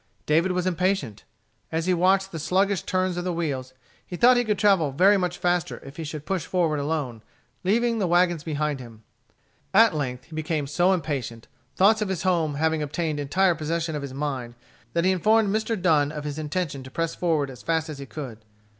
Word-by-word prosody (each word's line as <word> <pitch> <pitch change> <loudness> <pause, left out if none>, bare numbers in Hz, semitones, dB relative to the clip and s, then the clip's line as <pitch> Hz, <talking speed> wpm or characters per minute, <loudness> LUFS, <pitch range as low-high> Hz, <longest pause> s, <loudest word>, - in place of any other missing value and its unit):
David 165 +5 +2
was 180 0 -1
impatient. 180 - -1 0.5
As 165 0 -1
he 185 - +2
watched 190 +2 +2
the 165 - -5
sluggish 190 +4 +1
turns 185 -1 -1
of 175 - -2
the 180 - -1
wheels, 135 -7 -3 0.3
he 180 - -7
thought 240 +7 +6
that 245 - +3
he 245 - 0
could 210 -2 0
travel 190 -9 +3
very 185 +9 +5
much 180 -2 -1
faster 175 -1 0
if 135 +1 -11
he 165 - -4
should 150 -1 -6
push 190 -4 -1
forward 165 -4 0
alone, 140 -6 -2 0.4
leaving 230 +4 +2
the 190 - +1
wagons 175 -2 +2
behind 150 -3 -2
him. 115 -3 -12 0.7
At 225 -1 +7
length 130 -5 -3
he 160 - -12
became 155 -2 -1
so 175 +6 +2
impatient, 140 - -3 0.3
thoughts 215 +3 +4
of 210 - -1
home 165 -6 +1
having 160 +1 +1
obtained 150 +1 -2
entire 175 +6 +2
possession 160 0 -2
of 150 - -3
his 140 -1 -6
mind, 135 -5 -4 0.4
that 170 +1 +1
he 190 - +4
informed 210 +3 +3
Mr. 220 -1 -1
Dunn 155 -5 +3
of 150 -1 -6
his 150 0 -4
intention 155 -2 -3
to 130 - -10
press 165 +4 -2
forward 155 -6 0
as 125 - -12
fast 160 0 0
as 150 -3 -7
he 140 - -8
could. 130 -6 -7
165 Hz, 205 wpm, -25 LUFS, 145-185 Hz, 0.7 s, At